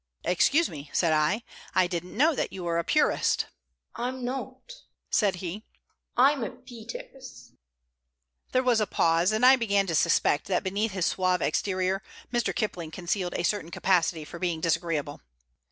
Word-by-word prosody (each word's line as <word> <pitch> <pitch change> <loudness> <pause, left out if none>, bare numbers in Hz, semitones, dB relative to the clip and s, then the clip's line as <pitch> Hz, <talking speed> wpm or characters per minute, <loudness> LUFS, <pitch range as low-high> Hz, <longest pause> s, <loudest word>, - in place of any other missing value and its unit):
"Excuse 275 - +3
me," 145 -1 -9
said 165 -3 +2
I. 155 +9 +1 0.3
"I 185 -1 +5
didn't 175 +2 -5
know 310 +5 +4
that - - -2
you 185 - -7
were 170 -1 0
a - - -1
purist." - - +2 0.5
"I'm 250 +1 -4
not," 260 - -6 0.4
said 200 -4 +2
he. 180 +4 -6 0.5
"I'm 270 +1 +4
a - - -2
Peters." 240 - -11 1.0
There 255 - +2
was 240 -3 +3
a 210 - +1
pause, 165 +3 +2
and 220 +3 +2
I 265 +1 +8
began 200 -4 +1
to 170 - -3
suspect 150 -1 +2
that 185 0 0
beneath 200 +2 -1
his 185 -3 0
suave 185 -1 +1
exterior 185 +3 0 0.3
Mr. 235 -5 +1
Kipling 175 -3 -3
concealed 175 +2 -3
a - - -1
certain 190 -3 -1
capacity 170 -3 +1
for 170 - -9
being 175 -3 -1
disagreeable. 165 -3 -1
185 Hz, 160 wpm, -27 LUFS, 170-235 Hz, 1.0 s, I